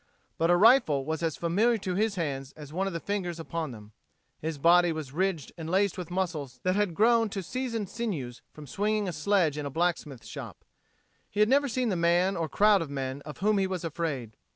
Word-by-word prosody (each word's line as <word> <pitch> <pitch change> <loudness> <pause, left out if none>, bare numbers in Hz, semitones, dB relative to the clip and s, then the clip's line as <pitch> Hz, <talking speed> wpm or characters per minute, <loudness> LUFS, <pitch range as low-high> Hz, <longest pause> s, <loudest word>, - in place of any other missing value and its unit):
But 165 - +2
a 175 - +5
rifle 185 - +5
was 160 +1 -2
as 165 -3 -1
familiar 210 +8 +2
to 190 -3 -3
his 210 +2 0
hands 140 -5 -3
as 150 -1 -11
one 190 +3 0
of 195 - -3
the 165 - -2
fingers 180 -3 -3
upon 165 -1 -4
them. 105 -3 -11 0.5
His 160 -1 -4
body 175 +3 +5
was 155 -5 -5
ridged 185 -3 -1
and 160 0 -5
laced 195 +1 +2
with 180 -2 -6
muscles 165 -9 -3
that 185 0 +1
had 205 -5 0
grown 230 +2 +4
to 195 -1 -4
seasoned 230 0 -3
sinews 160 - -4
from 150 - -11
swinging 210 +7 -1
a 180 - -3
sledge 160 -2 +1
in 145 - -4
a - - -4
blacksmith 160 -5 -2
shop. - - -9 0.6
He 205 - -5
had 210 +1 +5
never 280 +2 +4
seen 250 -1 0
the 190 - 0
man 175 +3 +2
or 165 -3 -2
crowd 205 +5 +4
of 160 - -4
men 135 0 -4
of 150 - -7
whom 210 0 +3
he 190 - +1
was 185 -2 -4
afraid. 150 -9 -3
175 Hz, 220 wpm, -28 LUFS, 150-200 Hz, 0.6 s, a